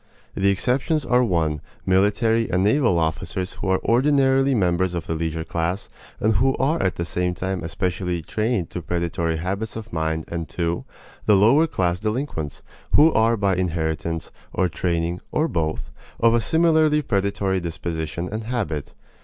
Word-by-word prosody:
The 100 Hz, 0 st, +2 dB
exceptions 135 Hz, -, +1 dB
are 125 Hz, 0 st, +3 dB
(1) 80 Hz, -, 0 dB, 0.2 s
military 105 Hz, +4 st, +2 dB
and 90 Hz, +1 st, +1 dB
naval 110 Hz, -3 st, +3 dB
officers 85 Hz, +3 st, -2 dB
who -, -, -5 dB
are 95 Hz, 0 st, +2 dB
ordinarily 135 Hz, +1 st, +3 dB
members 90 Hz, -3 st, +1 dB
of 85 Hz, -, -3 dB
the -, -, -2 dB
leisure 80 Hz, 0 st, -2 dB
class, 85 Hz, +4 st, -2 dB, 0.3 s
and 110 Hz, -1 st, +2 dB
who 135 Hz, +4 st, +2 dB
are 155 Hz, +5 st, +1 dB
at 95 Hz, -, 0 dB
the 85 Hz, -, -3 dB
same 90 Hz, +1 st, -1 dB
time 95 Hz, -1 st, -3 dB
specially 90 Hz, 0 st, -2 dB
trained 110 Hz, 0 st, -1 dB
to 90 Hz, -, -4 dB
predatory 85 Hz, -1 st, -1 dB
habits 95 Hz, +6 st, -3 dB
of 110 Hz, 0 st, -8 dB
mind 80 Hz, 0 st, -1 dB
and 85 Hz, -1 st, -5 dB
(2) 85 Hz, -1 st, -2 dB, 0.4 s
the 105 Hz, -, +6 dB
lower 125 Hz, +12 st, +5 dB
class 90 Hz, -, 0 dB
delinquents 105 Hz, -, -3 dB, 0.3 s
who 155 Hz, +2 st, +6 dB
are 115 Hz, +1 st, +3 dB
by 100 Hz, -2 st, +1 dB
inheritance, 80 Hz, -2 st, -2 dB, 0.2 s
or 95 Hz, -, +1 dB
training, 85 Hz, 0 st, -1 dB
or 155 Hz, -, +1 dB
both, 80 Hz, -, -2 dB, 0.3 s
of 115 Hz, 0 st, +4 dB
a 120 Hz, -, +3 dB
similarly 155 Hz, +1 st, +3 dB
predatory 100 Hz, -3 st, 0 dB
disposition 85 Hz, -1 st, -4 dB
and 110 Hz, +1 st, -4 dB
habit. 105 Hz, -, -3 dB
95 Hz, 160 wpm, -23 LUFS, 85-115 Hz, 0.4 s, the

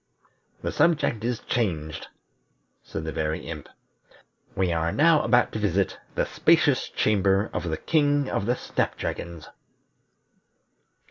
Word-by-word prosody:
"The -, -, -1 dB
subject 150 Hz, -9 st, +2 dB
is 120 Hz, -1 st, -2 dB
changed," 80 Hz, -9 st, -2 dB, 0.7 s
said 80 Hz, -, -6 dB
the 80 Hz, -, -4 dB
Very 80 Hz, 0 st, -2 dB
Imp. -, -, -8 dB, 0.9 s
"We 90 Hz, -2 st, +1 dB
are 85 Hz, 0 st, 0 dB
now 160 Hz, +1 st, +4 dB
about 120 Hz, -3 st, +3 dB
to 110 Hz, -, -4 dB
visit 100 Hz, -2 st, 0 dB, 0.2 s
the -, -, +1 dB
spacious -, -, +3 dB
chamber 100 Hz, 0 st, +1 dB
of 85 Hz, -, -2 dB
the 80 Hz, -, -2 dB
King 145 Hz, -, +2 dB
of 100 Hz, -, -2 dB
the 125 Hz, -, +2 dB
Snap -, -, -2 dB
dragons." 85 Hz, -2 st, -5 dB
100 Hz, 130 wpm, -25 LUFS, 85-125 Hz, 0.9 s, now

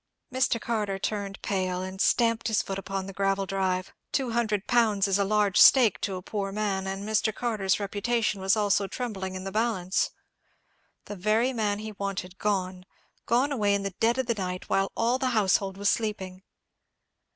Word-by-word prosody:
Mr. 255 Hz, -2 st, +1 dB
Carter 210 Hz, -4 st, -2 dB
turned 200 Hz, 0 st, -3 dB
pale, 185 Hz, -2 st, -1 dB
and 190 Hz, +1 st, -5 dB
stamped 230 Hz, -2 st, +2 dB
his 220 Hz, -2 st, +1 dB
foot 195 Hz, 0 st, -4 dB
upon 195 Hz, 0 st, -4 dB
the 195 Hz, -, -8 dB
gravel 195 Hz, 0 st, 0 dB
drive. 185 Hz, -1 st, -1 dB, 0.2 s
Two 260 Hz, -4 st, 0 dB
hundred 215 Hz, -4 st, 0 dB
pounds 215 Hz, -5 st, +3 dB
is 195 Hz, 0 st, +1 dB
a -, -, +3 dB
large 205 Hz, -1 st, +3 dB
stake 240 Hz, -7 st, +6 dB
to 195 Hz, -3 st, -2 dB
a 180 Hz, -, -7 dB
poor 200 Hz, -1 st, -3 dB
man; 195 Hz, -2 st, -2 dB
and 195 Hz, +2 st, -4 dB
Mr. 220 Hz, 0 st, +1 dB
Carter's 210 Hz, -5 st, 0 dB
reputation 205 Hz, +1 st, -1 dB
was 190 Hz, +3 st, +3 dB
also 205 Hz, -1 st, +2 dB
trembling 195 Hz, -6 st, -4 dB
in 185 Hz, -, -5 dB
the 195 Hz, -, -5 dB
balance. 210 Hz, -4 st, 0 dB, 1.0 s
The 205 Hz, -, -7 dB
very 215 Hz, +7 st, +1 dB
man 210 Hz, -3 st, 0 dB
he 215 Hz, +1 st, -6 dB
wanted 195 Hz, -2 st, -5 dB
gone—gone 200 Hz, +6 st, -2 dB
away 205 Hz, -7 st, +2 dB
in 200 Hz, -, -2 dB
the 195 Hz, -1 st, -3 dB
dead 235 Hz, +2 st, +2 dB
of 260 Hz, -, 0 dB
the 235 Hz, -, +1 dB
night, 185 Hz, -3 st, -4 dB
while 195 Hz, 0 st, +1 dB
all 235 Hz, +3 st, +1 dB
the 260 Hz, -1 st, 0 dB
household 195 Hz, -1 st, +2 dB
was 200 Hz, 0 st, +2 dB
sleeping! 190 Hz, -4 st, -3 dB
200 Hz, 180 wpm, -27 LUFS, 190-220 Hz, 1.0 s, stake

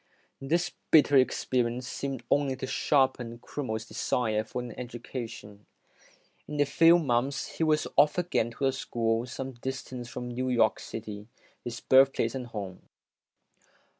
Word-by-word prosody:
This 170 Hz, +6 st, 0 dB, 0.2 s
bitter 145 Hz, -2 st, +6 dB
experience 125 Hz, -2 st, +1 dB
seemed 135 Hz, -3 st, -4 dB
only 140 Hz, -2 st, +2 dB
to 130 Hz, -, -5 dB
sharpen 130 Hz, -4 st, +1 dB
Crummeirs 115 Hz, -3 st, -4 dB
desire 110 Hz, -3 st, 0 dB
for 110 Hz, +3 st, -5 dB
an 120 Hz, -1 st, -5 dB
education. 115 Hz, -4 st, -8 dB, 0.8 s
In 150 Hz, -1 st, -5 dB
a 145 Hz, -, +5 dB
few 165 Hz, +4 st, +6 dB
months, 135 Hz, -2 st, -1 dB
he -, -, +1 dB
was 155 Hz, -1 st, +2 dB
off 145 Hz, +3 st, +5 dB
again 175 Hz, -10 st, +1 dB
to 120 Hz, +4 st, -3 dB
a 135 Hz, -, +4 dB
school 115 Hz, -2 st, -1 dB
some 135 Hz, +2 st, -5 dB
distance 130 Hz, -1 st, -6 dB
from 125 Hz, 0 st, -6 dB
New 130 Hz, +1 st, -2 dB
York 115 Hz, -3 st, +3 dB
City 105 Hz, -2 st, -7 dB, 0.4 s
his 120 Hz, 0 st, -6 dB
birthplace 135 Hz, +1 st, +4 dB
and 130 Hz, -2 st, -5 dB
home. 100 Hz, -5 st, -6 dB
125 Hz, 140 wpm, -28 LUFS, 115-135 Hz, 0.8 s, bitter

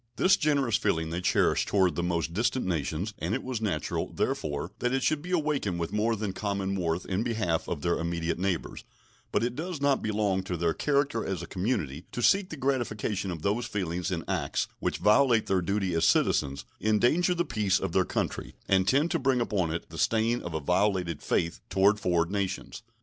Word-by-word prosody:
This 190 Hz, +1 st, +5 dB
generous 140 Hz, -, +2 dB
feeling 80 Hz, -7 st, 0 dB
they 85 Hz, +2 st, -2 dB
cherish -, -, +2 dB
toward 95 Hz, -3 st, +3 dB
the -, -, -2 dB
most 85 Hz, -2 st, -1 dB
distant 120 Hz, +6 st, 0 dB
nations, 85 Hz, +3 st, -2 dB
and 85 Hz, +8 st, -1 dB
it 130 Hz, -, -4 dB
was 125 Hz, -3 st, -3 dB
natural, 90 Hz, -9 st, -2 dB
therefore, 75 Hz, +3 st, -2 dB
that 125 Hz, +2 st, +1 dB
it 135 Hz, -, 0 dB
should 155 Hz, -2 st, +1 dB
be 175 Hz, -, -8 dB
awakened 150 Hz, -, 0 dB
with 85 Hz, -, -3 dB
more 110 Hz, +2 st, +1 dB
than 105 Hz, -3 st, -3 dB
common 100 Hz, -1 st, -2 dB
warmth 85 Hz, -1 st, -1 dB
in 95 Hz, +2 st, -1 dB
behalf 110 Hz, -8 st, -1 dB
of 75 Hz, -4 st, -3 dB
their 85 Hz, 0 st, +1 dB
immediate 85 Hz, 0 st, -2 dB
neighbors; 95 Hz, -2 st, -2 dB, 0.5 s
but -, -, +1 dB
it 120 Hz, +1 st, -1 dB
does 165 Hz, +2 st, -4 dB
not 140 Hz, -1 st, +2 dB
belong 105 Hz, -3 st, 0 dB
to 95 Hz, -2 st, -4 dB
their 85 Hz, 0 st, +1 dB
character 140 Hz, -5 st, +1 dB
as 95 Hz, -3 st, -3 dB
a -, -, -4 dB
community 90 Hz, -, -2 dB
to 120 Hz, -, -3 dB
seek 195 Hz, -, +4 dB
the 160 Hz, -, -7 dB
gratification 120 Hz, -7 st, -1 dB
of 85 Hz, -3 st, -5 dB
those 110 Hz, +4 st, 0 dB
feelings 90 Hz, -5 st, -2 dB
in 85 Hz, -3 st, -2 dB
acts -, -, -1 dB
which -, -, -1 dB
violate 115 Hz, +1 st, +4 dB
their 95 Hz, -1 st, +1 dB
duty 95 Hz, 0 st, -1 dB
as 80 Hz, 0 st, +1 dB
citizens, 70 Hz, -3 st, +2 dB, 0.2 s
endanger 120 Hz, -, +3 dB
the 175 Hz, 0 st, 0 dB
peace 105 Hz, -, +1 dB
of -, -, -3 dB
their -, -, +3 dB
country, -, -, -3 dB
and 95 Hz, -1 st, +3 dB
tend 145 Hz, +9 st, +3 dB
to 165 Hz, -, +1 dB
bring 130 Hz, -2 st, +2 dB
upon 95 Hz, -8 st, 0 dB
it 85 Hz, -, -4 dB
the -, -, -7 dB
stain 115 Hz, +2 st, +2 dB
of 85 Hz, -2 st, -5 dB
a -, -, 0 dB
violated 90 Hz, 0 st, 0 dB
faith 85 Hz, 0 st, 0 dB
toward 100 Hz, +2 st, +3 dB
foreign 85 Hz, -2 st, +1 dB
nations. 100 Hz, +2 st, -3 dB
100 Hz, 205 wpm, -28 LUFS, 85-120 Hz, 0.5 s, This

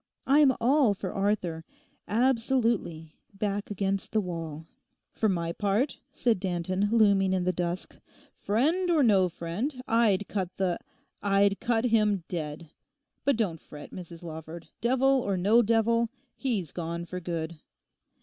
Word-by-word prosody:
I'm 280 Hz, 0 st, +6 dB
all 250 Hz, -2 st, +3 dB
for 190 Hz, -1 st, -5 dB
Arthur—absolutely—back 205 Hz, -, -1 dB
against 195 Hz, -1 st, -2 dB
the 220 Hz, -, +3 dB
wall.' 165 Hz, -5 st, -5 dB, 0.5 s
'For 220 Hz, -, 0 dB
my 170 Hz, -3 st, -1 dB
part,' 205 Hz, -, 0 dB
said 240 Hz, -7 st, +1 dB
Danton, 185 Hz, +2 st, -1 dB
looming 200 Hz, -4 st, +4 dB
in 185 Hz, -1 st, +1 dB
the 185 Hz, +1 st, +1 dB
dusk, 175 Hz, +1 st, -3 dB, 0.4 s
'friend 315 Hz, -, +1 dB
or 320 Hz, -4 st, +4 dB
no 195 Hz, -6 st, +4 dB
friend, 185 Hz, -, -4 dB
I'd 215 Hz, -4 st, +3 dB
cut 185 Hz, -3 st, -3 dB
the—I'd 195 Hz, +2 st, -1 dB
cut 235 Hz, 0 st, +1 dB
him 210 Hz, -5 st, +2 dB
dead. 155 Hz, -2 st, -5 dB, 0.5 s
But 280 Hz, -4 st, +3 dB
don't 185 Hz, -8 st, -1 dB
fret, 145 Hz, -1 st, -11 dB
Mrs 175 Hz, -1 st, -9 dB
Lawford, 160 Hz, 0 st, -8 dB
devil 260 Hz, +2 st, +3 dB
or 200 Hz, -4 st, -1 dB
no 210 Hz, +6 st, +5 dB
devil, 230 Hz, +1 st, +2 dB, 0.3 s
he's 215 Hz, -, -2 dB
gone 170 Hz, 0 st, -4 dB
for 180 Hz, +1 st, -5 dB
good. 165 Hz, -2 st, -4 dB
200 Hz, 130 wpm, -28 LUFS, 175-230 Hz, 0.5 s, I'm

